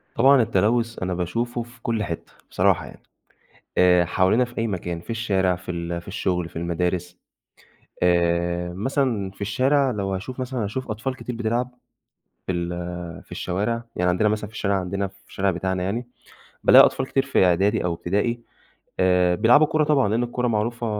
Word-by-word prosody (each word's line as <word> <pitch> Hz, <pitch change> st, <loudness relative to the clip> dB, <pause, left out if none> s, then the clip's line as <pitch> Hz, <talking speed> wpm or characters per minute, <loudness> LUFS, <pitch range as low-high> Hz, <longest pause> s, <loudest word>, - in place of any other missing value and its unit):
طبعًا 135 Hz, +2 st, +6 dB
التلوّث 115 Hz, +1 st, +1 dB
أنا 90 Hz, 0 st, -1 dB
باشوفه 115 Hz, +8 st, -2 dB
في 120 Hz, 0 st, -18 dB
كلّ 115 Hz, -2 st, -1 dB
حِتّة 85 Hz, -4 st, -6 dB, 0.2 s
بصراحة 90 Hz, -5 st, +2 dB
يعني -, -, -13 dB, 0.8 s
آآ، 90 Hz, -1 st, +5 dB
حوالينا 95 Hz, +8 st, +2 dB
في 120 Hz, -1 st, -9 dB
أي 115 Hz, -, +1 dB
مكان، 90 Hz, -4 st, -4 dB
في 90 Hz, -, -11 dB
الشارع، 95 Hz, -5 st, +1 dB
في 90 Hz, 0 st, -9 dB
ال 85 Hz, 0 st, -3 dB
في 85 Hz, -, -16 dB
الشغل، 90 Hz, -3 st, -1 dB
في -, -, -18 dB
المدارس 90 Hz, +1 st, -2 dB, 0.8 s
آآ، 85 Hz, 0 st, +1 dB
مثلًا 115 Hz, -2 st, -1 dB
في 95 Hz, -, -21 dB
الشارع 130 Hz, +7 st, +2 dB
لو 100 Hz, -4 st, -2 dB
هاشوف 120 Hz, +8 st, -6 dB
مثلًا، 125 Hz, -3 st, -2 dB
هاشوف 120 Hz, +4 st, -4 dB
أطفال 115 Hz, +5 st, -3 dB
كتير 125 Hz, -, -6 dB
بتلعب 120 Hz, +2 st, -1 dB, 0.8 s
في -, -, -1 dB
ال 85 Hz, -1 st, -5 dB
في -, -, -29 dB
الشوارع، 105 Hz, +6 st, -2 dB
يعني 90 Hz, 0 st, +1 dB
عندنا 90 Hz, +4 st, +2 dB
مثلًا 105 Hz, 0 st, -2 dB
في 110 Hz, -, -17 dB
الشارع، 100 Hz, -2 st, 0 dB
عندنا 95 Hz, +2 st, -2 dB
في 95 Hz, -, -21 dB
الشارع 95 Hz, 0 st, 0 dB
بتاعنا 95 Hz, +1 st, -2 dB
يعني 115 Hz, +6 st, -3 dB, 0.6 s
بالاقي -, -, +9 dB
أطفال -, -, -2 dB
كتير 135 Hz, 0 st, 0 dB
في 135 Hz, -8 st, +3 dB
إعدادي 95 Hz, +5 st, +2 dB
أو 85 Hz, -1 st, 0 dB
إبتدائي 105 Hz, +8 st, -1 dB, 0.6 s
آآ 90 Hz, -1 st, +3 dB
بيلعبوا 125 Hz, -, +5 dB
كورة 155 Hz, 0 st, +1 dB
طبعًا، 145 Hz, -6 st, +3 dB
لأن 110 Hz, +4 st, +1 dB
الكورة 120 Hz, 0 st, -1 dB
معروفة، 115 Hz, +2 st, -1 dB
100 Hz, 175 wpm, -23 LUFS, 90-120 Hz, 0.8 s, بالاقي